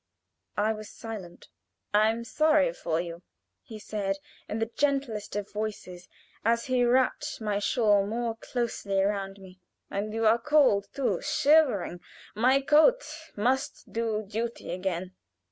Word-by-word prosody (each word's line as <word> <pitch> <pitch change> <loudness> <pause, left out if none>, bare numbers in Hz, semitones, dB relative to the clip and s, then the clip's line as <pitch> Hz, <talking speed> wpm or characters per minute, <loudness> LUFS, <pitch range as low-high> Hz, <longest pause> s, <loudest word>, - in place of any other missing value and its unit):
I 215 +2 +2
was 215 -1 -8
silent. 210 -7 -9 0.5
"I 215 +1 +5
am 230 +1 -2
sorry 305 - +3
for 165 -1 -2
you," 170 0 -5 0.4
he 220 - -10
said 200 -2 -3 0.3
in 215 - -2
the 225 - +1
gentlest 270 -8 -1
of 205 -1 -4
voices, 205 -4 -5 0.3
as 230 +1 +2
he 255 -2 +1
happed 260 +5 +2
my 210 -2 -1
shawl 205 -2 +3
more 230 +1 -2
closely 225 -5 -2
around 195 0 -1
me. 190 -1 -14 0.3
"And 205 +2 -2
you 225 +1 -1
are 225 +2 +5
cold 260 -8 +3
too 275 -2 0
shivering. 265 - +3 0.3
My 255 +6 +3
coat 315 - +5 0.3
must 255 +6 -1
do 220 -2 -1
duty 225 -1 -4
again." 185 0 -3
215 Hz, 140 wpm, -28 LUFS, 200-245 Hz, 0.5 s, I